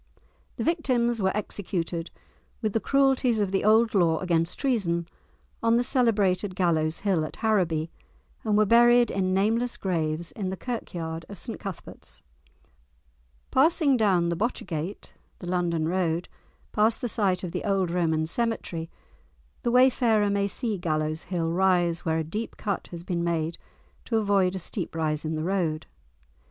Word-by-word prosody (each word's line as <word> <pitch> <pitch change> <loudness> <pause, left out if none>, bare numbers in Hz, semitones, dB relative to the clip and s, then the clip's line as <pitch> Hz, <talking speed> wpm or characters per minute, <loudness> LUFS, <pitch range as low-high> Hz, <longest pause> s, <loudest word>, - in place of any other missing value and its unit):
The - - -3
victims 250 - +1
were 190 0 +2
executed, 175 -5 -3 0.5
with 215 -3 -2
the 225 - +2
cruelties 265 -3 +2
of 200 -2 0
the 195 - 0
old 220 +2 +4
law 170 -5 +3
against 170 -1 0
treason, 180 - 0 0.5
on 230 0 +3
the 245 - +2
celebrated 205 -7 +1
Gallows 165 -4 +1
Hill, 190 -6 +1
at 155 - -6
Harraby, 175 -8 0 0.5
and 210 -2 +1
were 215 - +5
buried 240 +2 +5
in 185 -1 0
nameless 230 +5 +1
graves 165 -3 -2
in 195 -3 -4
the 190 - -4
Kirkyard 170 -9 -5
of 200 - -8
St 230 +6 -6
Cuthbert's. 170 - -9 1.3
Passing 290 0 +4
down 190 -7 +2
the 170 - 0
Botchergate 185 -4 -4 0.3
(the - - -9
London 170 -3 0
Road), 175 -1 0 0.4
past 220 +2 +2
the 245 - -1
site 195 -5 0
of 180 - -4
the - - -4
old 195 -4 0
Roman 160 -3 +1
cemetery, 170 -5 -2 0.7
the - - 0
wayfarer 235 -4 +4
may 200 0 +1
see 215 0 -2
Gallows 155 -2 -1
Hill 165 -3 -1
rise 175 -2 +2
where 160 -1 0
a 160 - 0
deep 210 +9 -5
cut 200 -3 -3
has 170 -1 -8
been 175 -2 -2
made 165 -1 -1 0.5
to 225 - 0
avoid 200 -3 +2
a - - -2
steep 180 -1 -5
rise 155 -2 -1
in 155 +1 -2
the 155 - -2
road. 170 -4 -1
190 Hz, 155 wpm, -26 LUFS, 170-220 Hz, 1.3 s, were